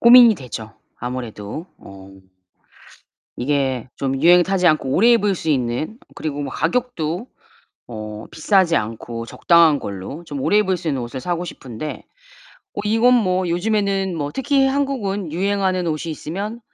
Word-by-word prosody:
고민이 235 -1 +9
되죠. 115 - -8 0.2
아무래도 125 - -6
어 95 0 -13 1.3
이게 130 -2 0
좀 135 -1 -1
유행 175 +2 +7
타지 185 0 0
않고 155 -4 +2
오래 225 - +5
입을 210 -4 +3
수 165 - -7
있는 130 - -1 0.2
그리고 145 -2 -4
뭐 140 -2 -4
가격도 180 -1 -1 0.6
어 110 -2 -7
비싸지 180 0 +3
않고 115 +1 -5
적당한 165 +3 +4
걸로 100 - -6
좀 145 -4 -6
오래 205 - +3
입을 190 -3 +1
수 170 -1 -7
있는 135 -4 0
옷을 120 +2 -5
사고 175 +4 -2
싶은데 140 -3 -7 0.7
뭐 205 - -3
이건 225 +4 +4
뭐 185 -6 +1
요즘에는 195 0 0
뭐 145 -2 -2
특히 275 - +2
한국은 225 - -1
유행하는 190 0 0
옷이 160 +1 -2
있으면 200 +10 -5
170 Hz, 295 characters per minute, -21 LUFS, 130-200 Hz, 1.3 s, 고민이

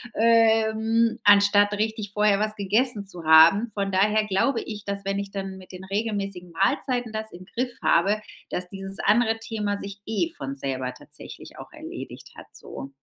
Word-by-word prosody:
ähm, 225 0 +3
anstatt 205 0 +5
richtig 215 0 -2
vorher 210 -1 +2
was 215 0 -1
gegessen 210 +2 0
zu 180 -3 -9
haben. 165 +8 +6
Von 200 -1 -1
daher 210 +3 +2
glaube 215 +6 +1
ich, 210 -2 -7
dass 200 -1 -5
wenn 195 0 -1
ich 200 0 -5
dann 195 -1 -6
mit 185 - -14
den 185 0 -10
regelmäßigen 195 -3 -3
Mahlzeiten 240 - 0
das 220 0 -4
im 180 +1 -11
Griff 245 +4 -4
habe, 200 +5 +3 0.3
dass 180 0 -3
dieses 195 +1 -7
andere 225 +1 +2
Thema 210 -2 -3
sich 200 0 -8
eh 195 -6 -1
von 135 0 -5
selber 130 -2 -3
tatsächlich - - -11
auch - - -11
erledigt - - -9
hat - - -12
so. 135 - -9
205 Hz, 170 wpm, -25 LUFS, 195-220 Hz, 0.3 s, haben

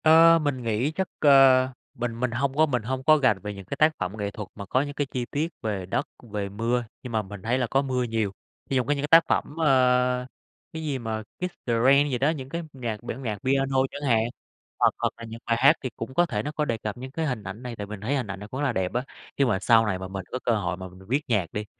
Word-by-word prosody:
Ờ, 165 +1 +7
mình 140 -4 -1
nghĩ 115 +5 0
chắc, 190 +3 -2
ờ, 135 -3 +6 0.2
mình 115 -1 -4
mình 125 -1 0
hông 135 +3 -1
có 155 +1 +5
mình 125 -6 -1
hông 130 +3 -3
có 155 +2 +6
rành 110 -7 +4
về 105 +2 -5
những 100 -1 -10
cái 140 - -5
tác 155 +2 +5
phẩm 100 +4 -3
nghệ 100 -1 -3
thuật 105 -1 -7
mà 100 - -7
có 130 +7 +1
những 145 0 -4
cái 145 -1 -2
chi 125 -2 -2
tiết 155 +4 -1
về 100 -4 -2
đất, 95 - -1 0.2
về 100 -1 -2
mưa, 115 +4 0 0.2
nhưng 125 - -6
mà 110 - +2
mình 105 -1 -9
thấy 115 +5 0
là 125 -2 0
có 135 +4 +2
mưa 130 -2 -1
nhiều. 110 -4 -1 0.4
Thí 135 - 0
trong 125 - 0
những 145 0 +1
cái 145 +1 -2
tác 165 +2 +7
phẩm, 145 - 0
ơ, 125 -3 +3 0.5
cái 160 0 -5
gì 145 -3 -1
mà 110 -2 -3 0.2
"Kiss 180 0 -3
the 120 - +2
rain" 140 +2 +5
gì 130 - 0
đó, 135 +5 +2
những 135 -5 -4
cái 170 +3 -4
nhạc 115 -5 -5
bản 120 +2 -5
nhạc 110 -4 -2
piano 135 0 +1
chẳng 145 -1 -3
hạn, 110 -2 +4 0.6
hoặc - - +4
hoặc - - -1
là 115 - -10
những 115 0 -8
bài 115 - +1
hát 140 +5 +7
thì 130 - -1
cũng 115 +3 -6
có 175 +5 +4
thể 105 -9 -2
nó 150 - -3
có 150 0 -1
đề 115 -5 -1
cập 105 0 -5
những 130 +1 -8
cái 160 +3 -2
hình 125 -7 -2
ảnh 100 +5 -7
này. 125 -1 -5
Tại 105 -2 -6
mình 105 -1 -7
thấy 125 +7 0
hình 130 -5 -2
ảnh 100 0 -6
này 105 - -8
cũng 130 +5 -4
là 140 -4 +1
đẹp 95 -1 -1
á. 125 +1 0 0.3
Nếu 140 - +3
mà 110 -6 +1
sau 115 +2 +5
này 95 -3 -1
mà 95 - -5
mình 95 -1 -6
có 130 - -2
cơ - - +2
hội 90 -4 -2
mà 95 0 -7
m - - -14
mình 95 - -16
viết 135 +6 +1
nhạc 105 -7 +2
đi, 105 0 -3
125 Hz, 290 wpm, -26 LUFS, 105-140 Hz, 0.6 s, Ờ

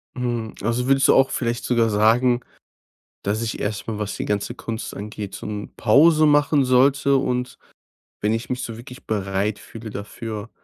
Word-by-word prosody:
Mhm, 120 -3 -3
also, 120 +3 0
würdest 135 0 +4
du - - +5
auch 135 0 +5
vielleicht 120 -1 -2
sogar 115 -2 +2
sagen, 120 +4 +3 0.8
dass 105 +3 -1
ich 115 - -3
erst 105 0 -3
mal, 110 -2 -4
was 105 -1 -3
die - - -3
ganze 105 +3 -2
Kunst 115 -2 -6
angeht, 105 -1 -6
so - - -7
'n 105 -1 -6
Pause 155 +7 +5
machen 145 -1 +4
sollte. 135 +2 +4
Und 125 -1 -2 0.6
wenn 105 +1 +2
ich 115 +2 -3
mich 125 0 -2
so 115 - -5
wirklich 125 +2 -12
bereit 100 0 -1
fühle 115 -1 -10
dafür, 105 +1 -6
115 Hz, 175 wpm, -22 LUFS, 105-125 Hz, 0.8 s, du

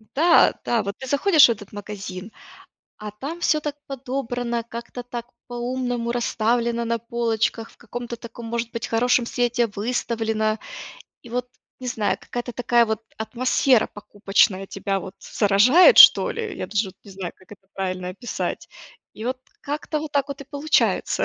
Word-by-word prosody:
да, 335 +4 +5
да, 235 -2 +2
вот 200 0 -4
ты 265 - -8
заходишь 300 +3 +6
в - - +4
этот 205 -3 -7
магазин, 205 -1 -7 0.7
а 210 0 -6
там 280 +11 -7
всё 305 -2 +2
так 295 -1 -4
подобрано, 245 -3 -3
как-то 235 +1 -7
так 240 -1 -7 0.2
по-умному 245 -1 -2
расставлено 235 0 0
на 230 0 -1
полочках, 230 -1 -1
в - - -22
каком-то 240 0 -7
таком, 235 0 -10
может 235 0 -3
быть, 230 -1 -4
хорошем 240 +1 +2
свете 240 0 +1
выставлено. 220 0 -1 0.6
И 235 - -13
вот, 250 +1 -2 0.3
не 255 - -6
знаю, 225 -4 0
какая-то 245 0 -5
такая 240 0 +3
вот 220 -1 -2 0.2
атмосфера 250 +2 +2
покупочная 195 -1 0
тебя 195 0 -2
вот 190 +1 -9
заражает 240 - +5
что - - +9
ли, 445 -3 -4
я - - -4
даже 205 +1 -1
вот 190 - -14
не 200 - -12
знаю, 190 -2 -6
как 185 - -17
это 195 -1 -16
правильно 185 -1 -3
описать, 205 +6 -4 0.5
и 220 - -8
вот 255 +1 -2 0.2
как-то 300 +1 -3
вот 305 -1 -6
так 280 -1 +1
вот 280 0 -6
и - - -7
получается. 290 +3 +1
235 Hz, 165 wpm, -23 LUFS, 210-250 Hz, 0.7 s, что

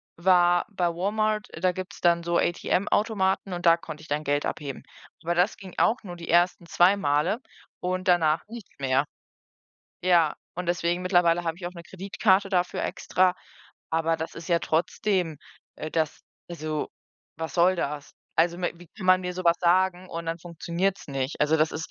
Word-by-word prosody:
war 175 0 +4
bei 185 -4 -1
Walmart, 210 +4 -1
da 185 0 +2
gibt's 185 +1 -8
dann 170 -1 +4
so 170 0 0
ATM-Automaten 195 +2 +1
und 175 0 -5
da 165 0 +7
konnte 155 -2 -9
ich 155 - -13
dann 150 +1 -1
Geld 145 0 0
abheben. 140 -3 -5 0.4
Aber 170 +1 0
das 180 +4 +2
ging 190 -3 -11
auch 230 +3 +4
nur 180 -3 -7
die 170 - -9
1. 175 0 +3
2 185 +4 +4
Male 150 - +1 0.4
und 185 +1 -2
danach 165 -3 +3
nichts 225 -3 -10
mehr. 135 +1 +2 1.0
Ja, 170 -4 +3 0.2
und 180 0 -4
deswegen 175 +1 0
mittlerweile 175 -2 +3
habe 165 -1 -2
ich 175 -1 -6
auch 180 - -6
'ne 170 -2 -10
Kreditkarte 195 +1 +1
dafür 180 -1 0
extra, 185 0 +1 0.6
aber 165 0 +1
das 160 - -6
ist 165 +2 -8
ja 170 -1 +3
trotzdem 170 0 0 0.4
äh, 155 - -5
das 160 -2 -1 0.3
also, 155 -3 -3 0.5
was 160 0 -5
soll 180 +2 +4
das? 145 -3 -4 0.2
Also, 170 +1 +3
m 175 -1 -1
wie 175 -2 -14
kann 185 - -6
man 185 0 +6
mir 180 0 -4
so 185 - -5
was 170 0 +5
sagen 185 +1 +2
und 165 -1 -6
dann 165 +1 -2
funktioniert's 175 +3 -3
nicht? 135 0 -3
Also, 150 +2 +3
das 155 +1 +2
ist 160 +1 -5
175 Hz, 180 wpm, -26 LUFS, 165-185 Hz, 1.0 s, da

